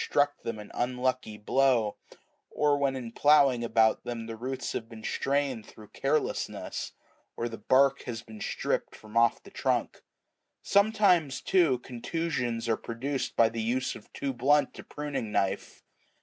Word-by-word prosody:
struck 145 Hz, 0 st, +1 dB
them 115 Hz, -1 st, -4 dB
an 105 Hz, -1 st, -10 dB
unlucky 125 Hz, -2 st, -1 dB
blow, 120 Hz, -1 st, +2 dB, 0.5 s
or 145 Hz, -1 st, +2 dB
when 140 Hz, -1 st, +1 dB
in 120 Hz, -3 st, -5 dB
ploughing 140 Hz, -3 st, +4 dB
about 110 Hz, -1 st, +3 dB
them 120 Hz, -2 st, -5 dB
the 115 Hz, 0 st, -6 dB
roots 130 Hz, +3 st, -4 dB
have 115 Hz, -, -4 dB
been 110 Hz, -2 st, -11 dB
strained 135 Hz, -4 st, 0 dB
through 105 Hz, 0 st, -14 dB
carelessness, 145 Hz, +3 st, -2 dB, 0.4 s
or 120 Hz, -, -1 dB
the 115 Hz, -1 st, -7 dB
bark 135 Hz, +5 st, +4 dB
has 115 Hz, -2 st, -5 dB
been 110 Hz, -2 st, -11 dB
stripped -, -, -2 dB
from 110 Hz, 0 st, -14 dB
off 115 Hz, 0 st, +3 dB
the -, -, -14 dB
trunk: -, -, -1 dB, 0.6 s
sometimes, 195 Hz, -9 st, +3 dB
too, 170 Hz, -9 st, +3 dB
contusions 125 Hz, -2 st, -3 dB
are 115 Hz, -, +2 dB
produced 130 Hz, +4 st, -3 dB
by 115 Hz, -, +6 dB
the 115 Hz, 0 st, -3 dB
use 125 Hz, +3 st, 0 dB
of 105 Hz, -, -13 dB
too 135 Hz, -1 st, -3 dB
blunt 140 Hz, +4 st, +2 dB
a -, -, -7 dB
priming 145 Hz, -7 st, -4 dB
knife. 95 Hz, -2 st, -1 dB
125 Hz, 155 wpm, -29 LUFS, 115-140 Hz, 0.6 s, by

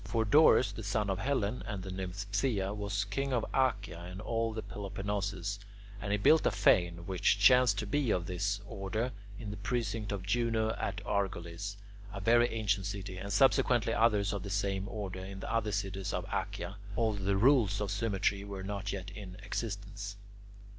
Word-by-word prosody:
For 115 Hz, -1 st, 0 dB
Dorus, 130 Hz, -3 st, +6 dB
the 100 Hz, -, -7 dB
son 100 Hz, 0 st, 0 dB
of 95 Hz, -, -2 dB
Hellen 125 Hz, -3 st, 0 dB
and 100 Hz, -3 st, -4 dB
the 95 Hz, -, -6 dB
nymph 95 Hz, +1 st, -4 dB
Phthia, 100 Hz, -2 st, 0 dB
was 100 Hz, -1 st, -1 dB
king 135 Hz, +8 st, -2 dB
of 120 Hz, -3 st, +1 dB
Achaea 130 Hz, -9 st, +1 dB
and 90 Hz, +2 st, -8 dB
all 115 Hz, +1 st, -1 dB
the 110 Hz, 0 st, -5 dB
Peloponnesus, 100 Hz, 0 st, -3 dB, 0.4 s
and 100 Hz, 0 st, -3 dB
he 105 Hz, -, +3 dB
built 155 Hz, +10 st, +5 dB
a -, -, +5 dB
fane, 85 Hz, -4 st, +3 dB
which 95 Hz, +2 st, +2 dB
chanced 125 Hz, 0 st, +6 dB
to 110 Hz, -, -1 dB
be 135 Hz, +5 st, 0 dB
of 90 Hz, -4 st, +1 dB
this 100 Hz, +3 st, -1 dB
order, 110 Hz, +4 st, -2 dB, 0.3 s
in 105 Hz, -3 st, -6 dB
the 105 Hz, -, -6 dB
precinct 115 Hz, -3 st, -2 dB
of 100 Hz, -2 st, -3 dB
Juno 110 Hz, +1 st, +1 dB
at -, -, -4 dB
Argolis, 100 Hz, 0 st, -2 dB, 0.3 s
a 100 Hz, -, -5 dB
very 120 Hz, +4 st, +5 dB
ancient 100 Hz, -3 st, 0 dB
city, 95 Hz, -2 st, -5 dB
and 100 Hz, -, -5 dB
subsequently 120 Hz, 0 st, +4 dB
others 105 Hz, -3 st, +3 dB
of 100 Hz, -, -3 dB
the 100 Hz, -, -6 dB
same 100 Hz, 0 st, -1 dB
order 95 Hz, -4 st, -5 dB
in 95 Hz, 0 st, -7 dB
the -, -, -4 dB
other 110 Hz, -2 st, +1 dB
cities 95 Hz, -2 st, -2 dB
of -, -, -2 dB
Achaea, 100 Hz, -, -3 dB, 0.2 s
although 110 Hz, -4 st, 0 dB
the 100 Hz, 0 st, +2 dB
rules 115 Hz, -4 st, +4 dB
of 105 Hz, -2 st, -2 dB
symmetry 100 Hz, -1 st, 0 dB
were 100 Hz, -1 st, -6 dB
not 100 Hz, 0 st, -3 dB
yet 95 Hz, -2 st, -5 dB
in 95 Hz, -2 st, -9 dB
existence. 100 Hz, -2 st, -4 dB
100 Hz, 185 wpm, -32 LUFS, 95-110 Hz, 0.4 s, Dorus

